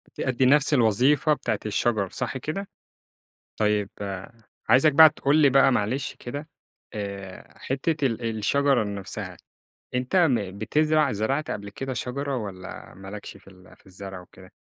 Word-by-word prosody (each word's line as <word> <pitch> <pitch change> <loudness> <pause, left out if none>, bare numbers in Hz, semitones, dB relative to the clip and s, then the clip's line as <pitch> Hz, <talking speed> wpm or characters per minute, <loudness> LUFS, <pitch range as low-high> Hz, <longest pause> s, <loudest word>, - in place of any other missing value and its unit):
تأدي 130 0 0
نفس 145 +3 +4
الوظيفة 130 +5 +3
بتاعة 110 -7 -2
الشجر 105 -1 0
صح 130 - -3
كده؟ 165 +10 -4 0.9
طيب 105 -2 +1 0.8
عايزك 140 +4 +5
بقى 155 +2 +9
تقول 145 -1 +1
لي 150 -3 +5
بقى 135 0 +5
معلش 125 +5 -1
كده 145 +5 -7 0.5
آآ 100 -2 -7
حِتة 140 +2 -1
ال 115 -2 -2
الشجرة 140 +2 +2
نفسها 100 -2 -6 0.6
أنت 125 +7 -1
م 115 - +2
بتزرع 150 +5 +2
زرعت 135 +9 -1
قبل 100 0 -5
كده 135 +5 -5
شجرة 140 +3 -3
والّا 95 -5 -7
ما 95 0 -11
لكش 100 0 -8
في 95 0 -17
ال 95 0 -18
في - - -29
الزرع 95 0 -9
وكده؟ 90 - -16
125 Hz, 145 wpm, -25 LUFS, 100-140 Hz, 0.9 s, بقى